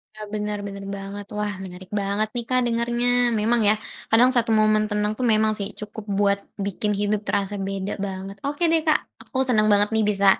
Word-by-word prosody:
Ah, 215 0 -7
bener 210 0 -2
bener 200 0 -7
banget. 200 +1 -7
Wah, 210 0 -1
menarik 185 0 -10
banget 200 +2 0
nih, 240 - -1
Kak, 255 0 +3
dengarnya. 235 +1 0 0.3
Memang 230 +3 +2
ya, - - +6 0.4
kadang 235 +3 +6
satu 235 -1 +2
momen 215 0 +4
tenang 210 0 0
tuh 255 - -1
memang 215 0 +3
sih, 200 - -2
cukup 210 0 -8
buat 200 -1 +3 0.3
bikin 205 +1 -1
hidup 205 0 +1
terasa 200 0 0
beda 195 0 -3
banget. 195 0 -6
Oke, 290 +4 -2
deh, 325 -1 +3
Kak, 310 - +5 0.2
aku 260 - -7
seneng 215 -4 +3
banget 205 0 +4
nih 220 -1 +3
bisa 200 -1 +1
210 Hz, 195 wpm, -24 LUFS, 200-225 Hz, 0.4 s, ya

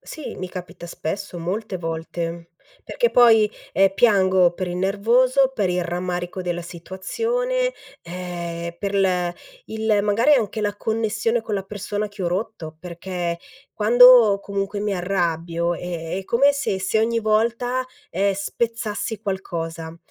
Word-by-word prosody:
Sì, 310 - -8
mi 185 0 -5
capita 180 -1 -8
spesso, 180 +3 -5
molte 190 +3 -3
volte, 165 +1 -5 0.3
perché 475 -1 0
poi, 225 -3 +6 0.2
ehm, 195 0 +4
piango 190 -5 +4
per 185 +1 -4
il 175 - -4
nervoso, 240 +8 +3
per 205 -7 0
il 180 0 0
rammarico 180 +1 -3
della 175 -1 -3
situazione, 460 - -2 0.3
ehm, 170 -1 -6
per 200 -1 -3
l 180 -3 +1 0.3
il 220 -1 0
magari 225 +8 +4
anche 220 -4 0
la 205 -1 -1
connessione 220 +1 0
con 220 -1 -4
la 195 - -1
persona 205 +1 -4
che 200 -1 -8
ho 175 - +1
rotto, 175 -4 -4
perché 175 0 -4 0.3
quando 235 -1 +7
comunque 200 0 -3
mi 205 -1 -1
arrabbio 170 -2 -1
è 170 0 -4
è 195 - -7
come 275 +8 +4
se 280 -9 -1
se 190 +3 +1
ogni 230 +1 +1
volta, 235 +4 +1 0.3
ehm, 195 +3 +1
spezzassi 220 +2 -3
qualcosa 165 -5 -5
195 Hz, 140 wpm, -22 LUFS, 175-220 Hz, 0.3 s, quando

